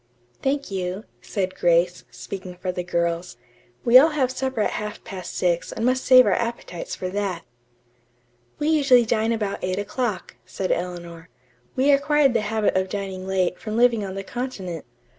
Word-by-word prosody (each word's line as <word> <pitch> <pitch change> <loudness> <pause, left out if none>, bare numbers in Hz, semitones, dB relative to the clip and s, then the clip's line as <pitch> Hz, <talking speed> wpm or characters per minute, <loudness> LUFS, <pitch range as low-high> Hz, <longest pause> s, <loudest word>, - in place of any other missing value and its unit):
"Thank 280 -3 -1
you," 185 +1 -3 0.2
said 190 -3 -2
Grace, 175 0 +2
speaking 185 -2 -8
for 180 +1 -3
the 180 0 -4
girls. 170 -2 -2 0.5
"We 240 +2 +9
all 310 +4 +5
have 275 -5 0
supper 260 -3 -2
at - - +1
half 210 0 -5
past 185 -3 -7
six 170 -2 0
and 225 - -2
must 255 +1 +2
save 255 -1 +8
our - - +2
appetites 230 -7 -3
for 185 - -4
that." 190 -3 -2 1.1
"We 295 - 0
usually 275 -6 +5
dine 225 0 +1
about 210 -3 -2
eight 185 0 -1
o'clock," 210 0 -3
said 190 - -3
Eleanor. 175 -1 -4 0.5
"We 270 +3 +4
acquired 285 -1 +3
the 230 - +2
habit 215 -1 0
of 185 0 +1
dining 190 -2 -5
late 185 -2 0
from 215 0 -4
living 235 -3 +4
on 190 -1 -5
the 195 - -4
continent. 195 - -5
200 Hz, 170 wpm, -23 LUFS, 180-245 Hz, 1.1 s, We